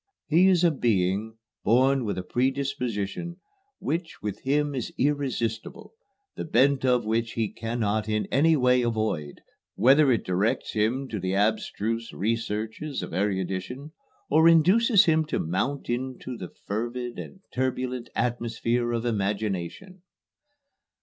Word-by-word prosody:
He 175 +4 +4
is 180 -2 +4
a 170 - +5
being 110 -4 0 0.3
born 130 +4 +3
with 100 - -2
a 90 - -3
predisposition 130 - -2 0.4
which 165 +2 -3
with 105 -1 -4
him 145 +2 +1
is 130 -4 -4
irresistible, 130 - -2 0.4
the - - -4
bent 135 -1 +3
of 125 -3 +2
which 115 +1 -1
he 110 -3 -1
cannot 110 -2 -2
in 105 0 0
any 160 +4 +4
way 125 -1 +4
avoid, 110 -11 -2 0.3
whether 135 +5 +5
it 115 - 0
directs 95 +5 0
him 115 +6 0
to 105 - -3
the 95 +1 -1
abstruse 110 +2 -1
researches 115 +6 -3
of - - -7
erudition 95 - -2 0.4
or 160 +3 +5
induces 190 +7 +5
him 160 -1 +3
to 150 - -2
mount 130 - -2
into 125 +1 -4
the 90 -6 -7
fervid 120 +3 -5
and 190 - -9
turbulent 130 -1 -2
atmosphere 120 0 -1
of 115 0 -2
imagination." 105 - -3
120 Hz, 130 wpm, -26 LUFS, 105-140 Hz, 0.4 s, a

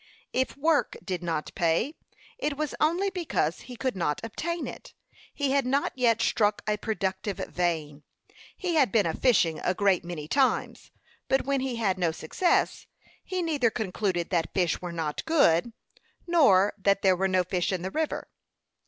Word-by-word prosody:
If 260 +1 -1
work 310 +1 +1
did 185 -3 -3
not 165 -3 -3
pay, 170 - +1 0.5
it 300 - -2
was 305 -1 -2
only 355 +6 +2
because 330 - -1
he 250 - -10
could 260 -1 -2
not 165 -5 -1
obtain 335 +10 -3
it. - - -9 0.4
He 280 -2 -1
had 280 0 +3
not 275 +2 +1
yet 230 -3 +2
struck 210 -2 +1
a 210 0 +1
productive 200 -1 -2
vein. 160 -4 -2 0.6
He 360 -2 -2
had 280 -10 +3
been 220 -3 +3
a 165 - 0
fishing 180 -10 +2
a 180 - 0
great 195 -3 +2
many 170 -4 -6
times; 265 - 0 0.4
but 265 -1 +1
when 275 0 +1
he 260 -2 -2
had 200 -5 0
no 170 -3 +2
success, 160 - 0 0.4
he 370 -1 -2
neither 290 -8 +2
concluded 190 -4 -2
that 165 -3 0
fish 180 -3 +1
were 180 -1 -5
not 160 -3 -3
good, 235 - +3 0.5
nor 235 - +4
that 200 +1 +2
there 190 -1 +5
were 190 +2 +1
no 185 -1 +2
fish 180 0 -1
in 180 -2 -2
the 190 - -3
river. 315 +5 -2
205 Hz, 170 wpm, -27 LUFS, 175-275 Hz, 0.6 s, there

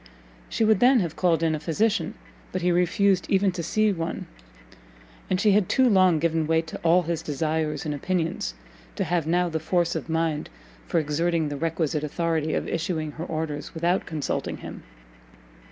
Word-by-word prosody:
She 225 - +1
would 215 -3 +4
then 250 +2 +6
have 165 -3 -3
called 165 -3 +2
in 160 -1 +2
a 155 - -2
physician, 205 +8 0 0.4
but 185 -1 -3
he 180 - +3
refused 180 +2 +2
even 195 0 +3
to 175 -1 -4
see 215 +6 +2
one; 165 -2 -4 1.0
and 185 - +1
she 210 +1 +4
had 200 -2 +3
too 260 -1 +4
long 185 -6 +5
given 160 0 0
way 160 0 +2
to 160 - -8
all 170 +2 +4
his 170 -1 -2
desires 155 +2 -2
and 150 - -1
opinions, 180 +5 -2 0.4
to 195 - -1
have 170 -2 -1
now 175 +2 +2
the 160 -1 -2
force 170 +2 +1
of - - -5
mind 160 -2 -1 0.4
for - - +2
exerting 160 +1 0
the 145 - -4
requisite 160 0 -1
authority 160 0 -1
of - - -2
issuing 165 -2 -2
her 160 +3 -6
orders 155 -3 -4
without 175 +3 0
consulting 155 -3 -3
him. - - -9
165 Hz, 180 wpm, -25 LUFS, 160-185 Hz, 1.0 s, then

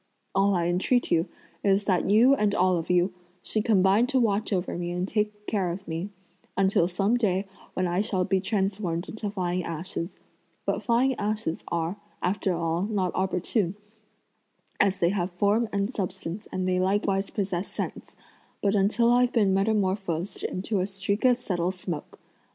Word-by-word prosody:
All 195 +1 +3
I 170 -1 +1
entreat 185 +8 +1
you 165 0 +3 0.4
is 200 0 +3
that 185 -3 +1
you 230 +6 +6
and 210 -6 +2
all 185 0 +3
of 165 - -4
you 180 +1 +3 0.3
should 215 - -1
combine 200 +2 +4
to 260 - +2
watch 215 -2 +1
over 180 -2 -1
me 175 0 -3
and 180 +1 -2
take 210 0 -2
care 195 -5 0
of 190 +3 -7
me, 165 +4 -3 0.5
until 190 -3 +3
some 195 +6 +1
day 195 -4 +1 0.3
when 185 - +1
I 175 +2 +1
shall 195 -4 0
be 190 0 +1
transformed 190 -4 -1
into 215 -1 -4
flying 180 -2 -1
ashes; 165 +2 -4 0.5
but - - 0
flying 250 +3 +2
ashes 210 -5 -2
are, 170 +3 -2 0.2
after 190 +1 0
all, 165 0 -1
not 195 -3 0
opportune, 185 +1 0 1.0
as 200 -1 +3
they 170 - +3
have 185 -2 -1
form 210 +5 +2
and 200 +4 -1
substance 185 -1 -4
and 185 0 -1
they 185 0 +2
likewise 195 +1 +1
possess 190 -3 -2
sense, - - -5 0.4
but 200 -1 +1
until 215 +4 +3
I've 245 0 +4
been 205 -5 +3
metamorphosed 195 -3 0
into 195 +2 -2
a 185 - 0
streak 200 +3 -2
of 250 -1 +5
subtle 180 -7 -1
smoke. 180 -4 -6
195 Hz, 170 wpm, -27 LUFS, 180-210 Hz, 1.0 s, you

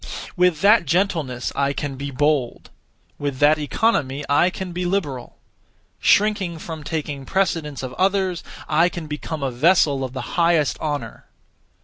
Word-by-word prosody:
With 180 -4 +2
that 205 -4 +5
gentleness 160 -7 0
I 140 0 +1
can 140 0 -4
be 140 +2 -5
bold; 140 -2 -1 0.5
with 145 -2 -3
that 150 +3 +4
economy 145 - 0
I 145 +5 +4
can 185 0 -6
be 180 +1 -3
liberal; 165 -9 -3 0.6
shrinking 200 -5 +2
from 160 -1 -7
taking 145 -3 -4
precedence 160 -5 -1
of 130 -1 -5
others, 190 -1 0 0.2
I 165 +3 +3
can 170 -2 -7
become 150 0 -5
a 135 - -1
vessel 145 0 +3
of 130 -1 -5
the 130 - -4 0.2
highest 165 -4 +2
honour. 145 -7 -4
155 Hz, 145 wpm, -22 LUFS, 140-180 Hz, 0.6 s, that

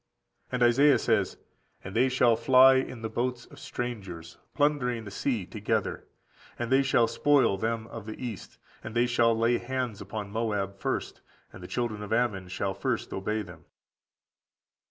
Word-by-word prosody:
And 125 -1 +1
Isaiah 135 +5 +5
says: - - 0 0.5
"And 95 +2 -8
they 130 +3 +4
shall 125 -2 +4
fly 130 +3 +6
in 130 -3 -3
the - - -1
boats 120 +2 -2
of - - -15
strangers, 95 -9 -6 0.2
plundering 135 -6 +1
the 105 - -8
sea 110 -1 -1
together, - - -2 0.5
and 120 +1 -4
(they 135 +1 +5
shall 130 -3 +3
spoil) 140 -4 +3
them 110 +2 -2
of 115 -2 -9
the 110 - -6
east: 120 -5 -7 0.3
and 110 - -7
they 120 +1 +4
shall 120 -1 +2
lay 115 +1 +2
hands 125 -4 -3
upon 100 +1 -6
Moab 100 -3 -2
first; - - -3 0.3
and - - -11
the 90 - -8
children 115 -2 -2
of 105 - -7
Ammon 110 -5 0
shall 95 +1 -2
first 120 +4 -2
obey 105 +3 -2
them." 90 -3 -13
115 Hz, 165 wpm, -28 LUFS, 105-125 Hz, 0.5 s, fly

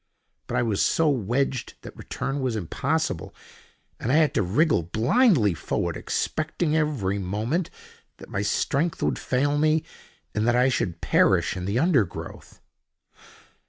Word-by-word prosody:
But - - -2
I - - +2
was 110 -4 0
so 165 - +2
wedged 130 +1 -1
that - - -10
return 135 +2 -4
was 130 -4 -1
impossible, 105 - -2 0.6
and 120 - -1
I - - +3
had 155 -1 +4
to - - +2
wriggle 110 - +2
blindly 115 - +3
forward, 80 - -2
expecting 155 0 -2
every 130 -12 0
moment 110 - -2 0.5
that - - -12
my 100 - -3
strength 140 +10 0
would - - 0
fail 145 +3 0
me, 155 +1 +2 0.5
and 110 +2 0
that 120 - +3
I 125 +2 +4
should 90 -9 -2
perish - - +3
in 90 -1 -4
the 100 +4 -1
undergrowth. 130 - -1
125 Hz, 145 wpm, -25 LUFS, 100-155 Hz, 0.6 s, had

